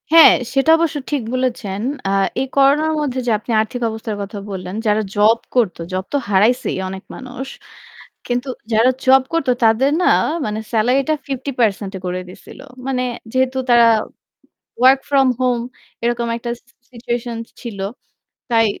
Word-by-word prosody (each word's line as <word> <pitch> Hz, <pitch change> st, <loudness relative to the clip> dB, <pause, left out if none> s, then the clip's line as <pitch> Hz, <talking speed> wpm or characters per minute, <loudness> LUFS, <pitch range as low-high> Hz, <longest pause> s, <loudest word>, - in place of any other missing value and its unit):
হ্যাঁ, 325 Hz, -1 st, +9 dB, 0.2 s
সেটা 270 Hz, +4 st, +3 dB
অবশ্য 325 Hz, -2 st, 0 dB
ঠিক 290 Hz, -3 st, 0 dB
বলেছেন। 235 Hz, -6 st, -2 dB, 0.3 s
আ -, -, 0 dB, 0.3 s
এই 265 Hz, -, -2 dB
করোনার 285 Hz, +3 st, +4 dB
মধ্যে 265 Hz, -4 st, -2 dB
যে -, -, +3 dB
আপনি 230 Hz, -, -6 dB
আর্থিক 245 Hz, +3 st, -5 dB
অবস্থার 220 Hz, -1 st, -5 dB
কথা 200 Hz, +1 st, -6 dB
বললেন, 185 Hz, 0 st, -6 dB
যারা 210 Hz, +1 st, +3 dB
জব 215 Hz, +3 st, +5 dB, 0.2 s
করতো, 225 Hz, -9 st, +1 dB
জব 185 Hz, 0 st, -1 dB
তো -, -, +3 dB
হারাইছেই 215 Hz, +6 st, +2 dB
অনেক 190 Hz, 0 st, -7 dB
মানুষ। 260 Hz, +1 st, -7 dB, 0.8 s
কিন্তু 245 Hz, +2 st, -2 dB, 0.2 s
যারা 230 Hz, +4 st, +5 dB
জব 265 Hz, 0 st, +6 dB
করত 330 Hz, -5 st, 0 dB, 0.2 s
তাদের 230 Hz, +5 st, +3 dB
না -, -, +3 dB, 0.4 s
মানে 215 Hz, 0 st, -3 dB
সেলারিটা 255 Hz, +7 st, +2 dB
৫০% 240 Hz, -7 st, -1 dB
করে 180 Hz, 0 st, -2 dB
দিয়েছিল। 180 Hz, -, -13 dB, 0.3 s
মানে 255 Hz, -2 st, 0 dB, 0.3 s
যেহেতু 260 Hz, 0 st, +1 dB
তারা 240 Hz, -1 st, +6 dB, 0.9 s
ওয়ার্ক 260 Hz, +2 st, +6 dB
ফ্রম 275 Hz, -2 st, +4 dB
হোম 250 Hz, -2 st, +2 dB, 0.4 s
এরকম 235 Hz, 0 st, 0 dB
একটা 235 Hz, 0 st, -4 dB, 0.4 s
সিচুয়েশন 240 Hz, -1 st, -4 dB, 0.2 s
ছিল। 230 Hz, -5 st, -7 dB, 0.7 s
তাই 225 Hz, -1 st, +4 dB
245 Hz, 145 wpm, -19 LUFS, 220-265 Hz, 0.9 s, হ্যাঁ